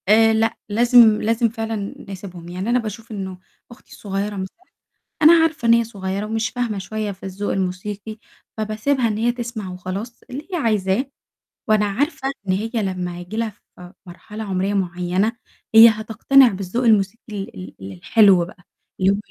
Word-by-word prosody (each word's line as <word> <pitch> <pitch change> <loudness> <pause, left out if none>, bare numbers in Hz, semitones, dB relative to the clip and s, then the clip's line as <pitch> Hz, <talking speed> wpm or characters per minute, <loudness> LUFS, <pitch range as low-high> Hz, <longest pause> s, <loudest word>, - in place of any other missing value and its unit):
آآ، 225 +1 +6
لأ، 225 +1 +1
لازم 230 0 +5
لازم 230 +1 +1
فعلًا 220 -2 -4
نسيبهم، 180 -3 -9
يعني 185 +5 -4
أنا 245 +1 +3
باشوف 225 0 -7
إنه 190 -3 -5 0.3
أختي 240 - -15
صغيرة 200 +1 -3
مثلًا 190 -1 -6 0.7
أنا 310 +2 +9
عارفة 320 -5 0
إن 230 - +8
هي 235 0 +3
صغيرة، 200 -2 -4
ومش 220 0 -1
فاهمة 245 -4 -2
شوية 215 +2 -4
في 190 - -17
الذوق 195 +2 -3
الموسيقي، 195 +3 -4 0.4
فباسيبها 220 +4 0
إن 210 -1 -2
هي 235 +2 +2
تسمع 235 -5 -6
وخلاص، 190 +6 -6
اللي 280 +6 -7
هي - - 0
عايزاه، 220 - 0 0.6
وأنا 215 -1 +3
عارفة 270 +6 -1 0.2
إن 185 - +2
هي 210 +4 -2
لمّا 185 -5 -2
هييجي 175 +5 -7
لها 230 -1 0 0.3
ف - - -13 0.2
مرحلة 210 +5 -9
عمرية 195 0 -1
معيّنة، 180 +2 0 0.4
هي 225 +1 +11
هتقتنع 225 +5 +4
بالذوق 195 +3 -2
الموسيقي 215 0 +2
ال 95 - -7
ال 95 +1 -7
الحلو 185 - +4
بقى، 180 +1 -15 0.4
اللي 190 +1 +4
هو 200 - 0
210 Hz, 165 wpm, -21 LUFS, 190-230 Hz, 0.7 s, هي